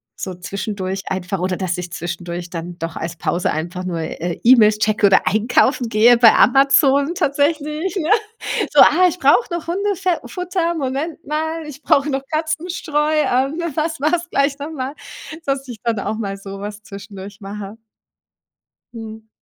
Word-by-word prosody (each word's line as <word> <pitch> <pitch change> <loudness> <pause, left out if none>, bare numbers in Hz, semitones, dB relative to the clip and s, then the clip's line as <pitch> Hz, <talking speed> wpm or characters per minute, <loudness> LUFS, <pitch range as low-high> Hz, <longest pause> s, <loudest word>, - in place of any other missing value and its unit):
so 185 +6 -6
zwischendurch 190 +1 -4
einfach 190 0 -3
oder 185 0 -1
dass 185 -2 -2
ich 180 -1 -6
zwischendurch 175 0 -5
dann 175 0 -6
doch 165 0 -5
als 165 +1 -5
Pause 175 +2 -1
einfach 175 +4 -4
nur, 175 -2 -3
äh, 165 +1 -4
E-Mails 225 -4 +6
checke 215 -1 +3
oder 195 - +3
einkaufen 240 +3 +2
gehe 235 +2 +5
bei 230 -2 +8
Amazon 275 +3 +4
tatsächlich, 300 +4 0
ja. 350 -1 -1 0.6
So, - - +7
ah, 365 - +6
ich 355 +1 -4
brauche 430 +1 +3
noch 340 -1 -5
Hundefe 380 -1 0
Futter, 360 -2 -2
Moment 290 +2 -3
mal, 315 +2 -3
ich 295 -1 -9
brauche 280 +1 +2
noch 270 -1 -1
Katzenstreu, 315 -1 -1
ähm, 285 +1 +1 0.2
was 315 -1 -1
war 305 +2 +1
es 345 0 -3
gleich 280 0 +1
noch 290 +3 -6
mal 270 -2 -4 0.5
dass 275 -1 -1
ich 240 -3 -7
dann 230 -4 -1
auch 215 - -3
mal 200 -3 -3
so 195 0 -9
was 205 +1 -7
zwischendurch 200 0 -10
mache. 205 +1 -8 1.2
Mhm. 220 -1 -9
245 Hz, 165 wpm, -19 LUFS, 195-305 Hz, 1.2 s, bei